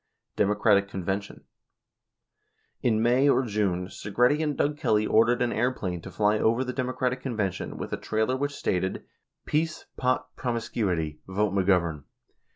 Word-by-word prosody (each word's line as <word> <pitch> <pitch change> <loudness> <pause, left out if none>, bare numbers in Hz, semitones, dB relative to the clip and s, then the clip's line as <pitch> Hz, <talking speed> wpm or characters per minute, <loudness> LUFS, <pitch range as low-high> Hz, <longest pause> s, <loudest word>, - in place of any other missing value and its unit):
Democratic 105 0 +3
Convention: 95 +1 -4 1.4
In 110 -2 +2
May 125 +4 +4
or 135 -1 +3
June, 100 -5 0
Segretti 125 +10 +1
and 150 -3 -1
Doug 145 +1 +1
Kelly 110 -7 +1
ordered 115 +3 +3
an 120 - 0
airplane 95 -9 -1
to - - -9
fly 105 0 +1
over 115 +3 +2
the 125 -1 -4
Democratic 125 0 -1
Convention 105 -8 -3
with - - -5
a - - 0
trailer 110 +4 0
which 145 +2 -1
stated, 95 +1 -2 0.4
"Peace, 155 +1 -1
Pot, 130 0 -1
Promiscuity. 100 - -2
Vote 100 +1 0
McGovern." 90 -6 +1
110 Hz, 140 wpm, -27 LUFS, 95-125 Hz, 1.4 s, May